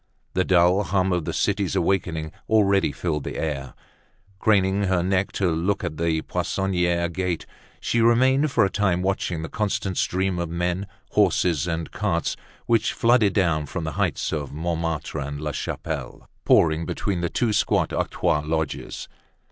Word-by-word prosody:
The 95 - +2
dull 90 +1 +4
hum 95 -1 +1
of 90 -3 -1
the - - -2
city's - - 0
awakening 80 -5 0 0.2
already 100 -6 +3
filled 75 -2 -2
the - - -5
air. 70 -4 -3 0.6
Craning 100 -1 +3
her 90 -2 +1
neck 95 +1 +1
to 95 -3 +1
look 85 +5 0
at 75 - -4
the 80 -1 0
Poissonniere 90 -3 0
gate, 90 -1 -2 0.3
she 115 - 0
remained 130 +5 +4
for 120 -6 +3
a - - 0
time 95 -4 +1
watching 90 -4 -1
the - - -4
constant 100 -2 -2
stream 95 -1 0
of 85 -1 -2
men, 90 +3 -2 0.2
horses, 85 -2 +2
and 80 -2 -3
carts - - -1 0.3
which 115 -2 +2
flooded 115 -4 +3
down 80 -7 +1
from 85 +4 -4
the 80 - -3
heights - - -1
of 75 -3 -3
Montmartre 80 -1 -3
and 70 0 -4
La 75 0 -3
Chapelle, - - -5 0.2
pouring 80 0 +4
between 95 -4 -2
the 85 - 0
two 115 +2 0
squat - - +2
octroi 75 - 0
lodges. 80 -1 -3
90 Hz, 160 wpm, -24 LUFS, 80-95 Hz, 0.6 s, dull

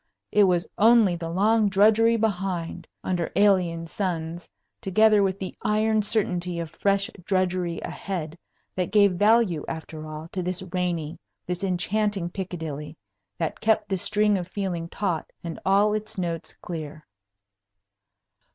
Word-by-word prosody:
It 210 -1 +5
was 175 -2 +2
only 220 -4 +6
the 165 -1 -5
long 210 +4 +3
drudgery 220 +4 +4
behind, 195 -6 -2 0.2
under 175 -3 -1
alien 180 -5 +3
suns, 170 -2 -4 0.3
together 215 +2 +4
with 195 -1 +1
the 190 -1 -6
iron 215 +1 +2
certainty 180 -5 -1
of 165 -2 -5
fresh 200 0 +1
drudgery 185 -2 0
ahead, 170 -5 -5 0.4
that 180 -2 -1
gave 200 -2 +5
value, 205 -3 +3
after 160 -1 -6
all, 155 +1 -7
to 185 - -3
this 180 +1 -3
rainy, 170 -4 -2 0.3
this 180 +2 -4
enchanting 195 0 0
Piccadilly 160 -5 -6 0.4
that 165 -2 -3
kept 220 -1 +2
the 195 - +1
string 210 +2 +2
of 175 - -5
feeling 185 -4 -3
taut 180 -6 -2
and 165 -1 -6
all 200 +2 +3
its 215 -1 -4
notes 165 -3 -3
clear. 155 -3 -6
185 Hz, 135 wpm, -25 LUFS, 170-205 Hz, 0.4 s, only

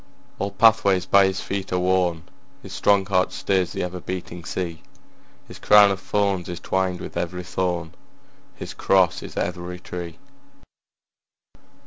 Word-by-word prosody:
All 100 - -1
pathways 100 -3 +3
by 100 0 +5
his 95 0 -3
feet 100 -1 -4
are 90 - +1
worn, 90 -2 +1 0.4
His 95 - -9
strong 100 0 +3
heart 95 -2 +1
stirs 95 -2 0
the - - -3
ever 90 0 -5
beating 90 -1 -6
sea, 85 -3 -4 0.7
His - - -12
crown 105 -1 +6
of 95 - -2
thorns 100 -2 -1
is 85 -1 -5
twined 95 -1 -1
with - - -8
every 90 +1 -3
thorn, 90 -2 -2 0.6
His - - -7
cross 95 -3 +2
is - - -10
every 90 0 -3
tree. 85 -2 -7
90 Hz, 145 wpm, -23 LUFS, 90-95 Hz, 0.7 s, crown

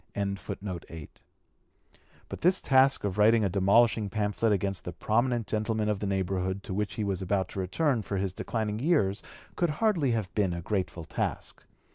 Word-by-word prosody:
] - - -39
But 100 -1 -2 2.0
this 180 +2 +4
task 135 0 +3
of 100 0 -2
writing 110 +1 +5
a - - +1
demolishing 100 +3 +3
pamphlet 105 +2 0
against 100 -1 -1
the 90 - -6
prominent 120 +5 0
gentlemen 110 0 -1
of 105 -2 0
the 100 - -2
neighborhood 95 0 -1
to - - -5
which 105 +2 -2
he 110 - -2
was 95 -2 -2
about 95 0 0
to - - -6
return 115 - 0
for 100 -1 -4
his 95 -1 -1
declining 110 +1 -3
years 115 - +1 0.3
could 175 - +1
hardly 170 - +1
have 110 -5 -1
been 95 -4 +1
a 85 - -5
grateful 90 -3 -2
task. 80 - -4
105 Hz, 170 wpm, -28 LUFS, 95-115 Hz, 2.0 s, writing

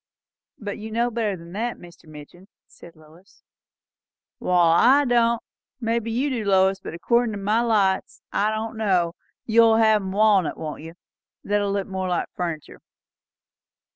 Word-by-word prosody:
"But 205 -2 -6
you 220 +1 -7
know 235 +2 0
better 215 -4 -2
than 170 0 -13
that, 230 +5 -3
Mr. 170 -2 -16
Midgin," 155 +5 -13 0.2
said 170 - -16
Lois. 155 +5 -21 1.0
"Wall, 175 -2 +3
I 275 +10 +5
don't! 235 -2 +2 0.4
Maybe 230 -1 -1
you 260 +5 -1
do, 235 -4 -2
Lois; 190 -1 +2
but 180 - -8
accordin' 235 +5 +1
to - - -4
my 210 +3 +1
lights 205 -5 0
I 210 +1 +1
don't 220 +1 -4
know. 185 -6 +1 0.3
You'll 225 0 +5
hev 220 -1 +4
'em 190 -1 -5
walnut, 200 -3 +2
won't 155 -2 -6
you? 165 +2 -10 0.5
that'll 205 0 0
look 200 -1 -1
more 190 -1 -3
like 175 - -1
furniture." 170 -4 -5
205 Hz, 155 wpm, -23 LUFS, 180-225 Hz, 1.0 s, I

